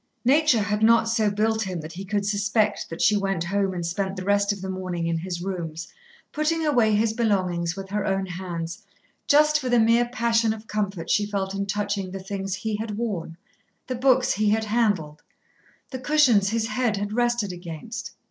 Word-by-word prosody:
Nature 270 -4 +4
had 210 +1 -1
not 230 +1 +5
so 225 -2 +2
built 220 +2 0
him 185 -4 -3
that 155 +1 -8
he 190 - -6
could 200 +1 -1
suspect 205 +1 0
that 165 - -3
she 210 - +5
went 195 -4 0
home 195 +2 0
and 175 -2 -4
spent 190 +3 -2
the 185 - -5
rest 200 +1 +2
of 205 - -4
the 190 - -6
morning 185 -2 -3
in 165 0 0
his 175 0 -5
rooms, 170 -4 -5 0.4
putting 315 +1 0
away 240 -8 +3
his 220 +1 +2
belongings 185 -7 0
with 195 -1 -7
her 205 0 -1
own 195 0 0
hands, 175 -2 -5 0.5
just 300 +1 +5
for 260 -3 -3
the 245 -1 +4
mere 230 +2 +4
passion 230 -2 +1
of 220 0 -10
comfort 200 -6 -3
she 210 - +2
felt 195 -2 -2
in 200 0 -3
touching 205 -1 -2
the 195 +1 -6
things 195 0 -4
he 210 +2 -3
had 215 -1 -4
worn, 185 -8 -3 0.5
the 255 - -3
books 255 0 +3
he 210 +1 +1
had 220 +1 +2
handled, 205 -9 0 0.7
the 260 - -5
cushions 255 -8 +4
his 225 +1 -1
head 245 -5 0
had 205 +1 -3
rested 240 -4 0
against. 175 +6 -7
205 Hz, 195 wpm, -24 LUFS, 190-230 Hz, 0.7 s, not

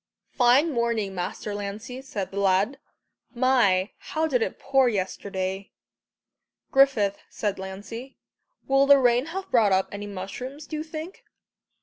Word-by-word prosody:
"Fine 255 +6 +4
morning, 235 -5 0
Master 190 +3 -4
Lancey," 205 +5 -6
said 205 -8 -5
the 200 - -3
lad. 200 +7 +2 0.6
"My, 235 -7 +3
how 315 - -3
it - - -2
did 250 -5 0
pour 270 -2 +3
yesterday!" 190 -1 -3 1.0
"Griffith," 245 -8 +3
said 205 -3 -3
Lancey, 205 +7 -8 0.5
"will 270 +1 +4
the 280 0 +8
rain 245 +1 +3
have 375 +4 -6
brought 220 -5 +4
up 190 0 +2
any 205 0 -6
mushrooms, 225 +9 -7
do 310 - -6
you - - -3
think?" 315 +3 -8
235 Hz, 135 wpm, -25 LUFS, 200-270 Hz, 1.0 s, the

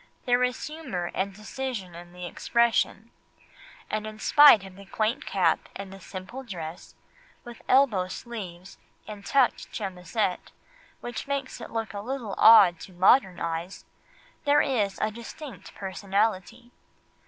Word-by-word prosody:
There 245 0 +3
is 250 0 -1
humour 260 - -5
and 195 +1 -1
decision 215 -2 -6
in 175 +1 -11
the 180 0 -8
expression, 235 +6 0 0.8
and 215 0 -3
in 215 0 -8
spite 285 -3 +7
of 190 -1 -11
the 200 0 -13
quaint 220 +4 -1
cap - - +1
and 195 -1 -7
the 195 - -11
simple 195 +8 -8
dress 175 -9 -8 0.5
with 240 -1 -11
elbow 245 -9 +4
sleeves 185 -4 -8 0.3
and 210 -2 -8
tucked 265 +3 +1
chemisette, 185 -1 -3 0.5
which 240 +3 -6
make 275 -2 -2
it - - -8
look 225 -3 -4
a 200 - -5
little 240 -3 -4
odd 195 -7 +8
to 190 - -11
modern 185 +1 +4
eyes, 165 +3 -4 0.6
there 290 0 +4
is 210 -8 0 0.2
distinct 240 +5 -10
personality. 200 +4 -2
210 Hz, 135 wpm, -27 LUFS, 185-245 Hz, 0.8 s, odd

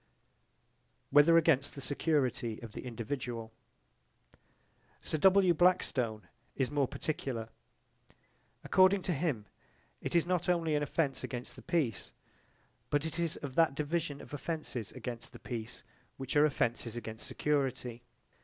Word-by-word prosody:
Whether 150 +4 +7
against 140 -4 +3
the - - -7
security 130 -5 0
of 115 - -7
the - - -8
individual 115 -1 -4 1.5
Sir 155 - -2
W. 190 0 +6
Blackstone 130 - +2 0.3
is 130 -1 0
more 145 -2 +2
particular. 120 -8 -3 1.1
According 190 0 +5
to 180 - 0
him 140 -9 -1 0.6
it - - -3
is 170 - +4
not 180 0 0
only 165 -3 +2
an 150 - +2
offence 145 -2 0
against 125 -1 -5
the - - -11
peace, 150 - -1 0.8
but 145 +1 +1
it 160 +1 -4
is 170 -2 0
of 140 -3 -6
that 160 -2 +3
division 150 -1 -2
of - - -12
offences 145 -8 -4
against 120 -2 -6
the - - -11
peace 115 -2 -6 0.3
which 135 0 -4
are 145 +1 +7
offences 120 -5 0
against 110 0 -6
security. 130 -3 -1
140 Hz, 135 wpm, -32 LUFS, 120-165 Hz, 1.5 s, Whether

